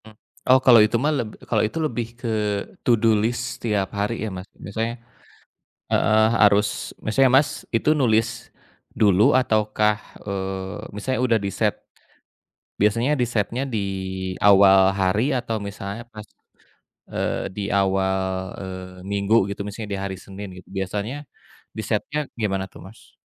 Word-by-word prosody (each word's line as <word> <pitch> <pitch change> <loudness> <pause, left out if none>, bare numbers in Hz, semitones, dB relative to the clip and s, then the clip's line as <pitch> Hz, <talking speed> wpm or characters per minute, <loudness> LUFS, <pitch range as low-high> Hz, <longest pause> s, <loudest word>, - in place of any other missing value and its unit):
Mmm. 110 -1 -15 0.3
Oh, 130 +1 +7
kalau 120 -4 +8
itu 110 - 0
mah 150 - +2
leb 120 -4 -2 0.2
kalo - - +2
itu 110 - -8
lebih 120 -5 -2
ke 120 -2 -4 0.5
to - - +2
do 110 0 +3
list 120 +2 -2
setiap 105 -4 0
hari 105 +2 -2
ya, - - -3
Mas. 90 +1 -8
Misalnya 115 +4 -3 1.0
heeh, 110 0 +4
harus, 105 0 +2
misalnya, 130 +4 +3
Mas, - - -6 0.2
itu 115 +6 +2
nulis 115 -3 +3 0.7
dulu 100 -2 +4
ataukah, 105 -3 +2 0.2
eee, 95 -1 -4 0.2
misalnya 130 +6 -2
udah 115 -2 +3
di-set, 100 -1 0 1.1
biasanya 115 +6 +2
di-set-nya 120 0 -1
di 110 - +1 0.7
awal 100 -1 +7
hari 100 +8 +1
atau 115 -2 -2
misalnya 100 +3 -6
pas, 105 0 -9 0.8
eee, - - -2
di 105 - -4
awal, 95 -1 +1 0.4
eee, 95 -1 -8
minggu 100 +2 +1 0.2
gitu, 100 - -7
misalnya 105 +1 -6
di 100 - -3
hari 95 -1 -3
Senin 100 +1 -8
gitu, 90 - -14
biasanya 100 +5 -3 0.6
di-set-nya 110 +6 -2 0.2
gimana 95 -3 0
tuh, - - -13
Mas? 110 +4 -17
105 Hz, 140 wpm, -23 LUFS, 100-115 Hz, 1.1 s, kalau